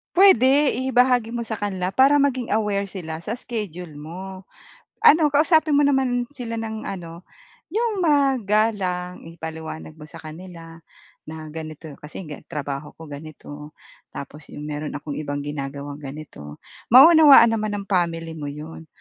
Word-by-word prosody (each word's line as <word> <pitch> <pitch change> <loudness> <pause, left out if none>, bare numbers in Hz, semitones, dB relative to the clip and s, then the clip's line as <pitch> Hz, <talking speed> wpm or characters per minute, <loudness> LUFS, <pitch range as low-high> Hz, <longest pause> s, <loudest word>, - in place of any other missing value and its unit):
Puwede! 285 - +5
Ibahagi 250 -2 +2
mo 240 - -3
sa 225 -1 -4
kanila 190 -3 -2
para 270 +9 +4
maging 260 -4 0
aware 210 -2 0
sila 170 -4 -7
sa - - -3
schedule 180 -10 -6
mo. 185 +5 -9 0.6
Ano, 310 +1 +7
kausapin 305 +1 +3
mo 290 - +5
naman 265 -3 +2
sila 245 -5 -6
ng 220 -1 -5
ano, 170 -2 -8 0.4
'yong 435 +3 -1
magalang. 215 - +1
Ipaliwanag 160 -1 -8
mo 150 - -10
sa 155 - -13
kanila 165 +1 -11 0.5
na 155 0 -8
ganito, 155 0 -8
kasi 150 +5 -9 0.2
trabaho 145 -2 -5
ko 160 -2 -12
ganito. 150 0 -10 0.4
Tapos 145 +2 -9
'yong - - -10
meron 150 0 -5
akong 145 0 -5
ibang 145 -1 -4
ginagawang 140 0 -6
ganito. 135 - -10 0.3
Mauunawaan 285 -3 +9
naman 215 -2 -1
ng 200 0 -6
family 165 -3 0
mo 145 - -5
'yon. 155 +3 -8
185 Hz, 140 wpm, -23 LUFS, 155-245 Hz, 0.6 s, Mauunawaan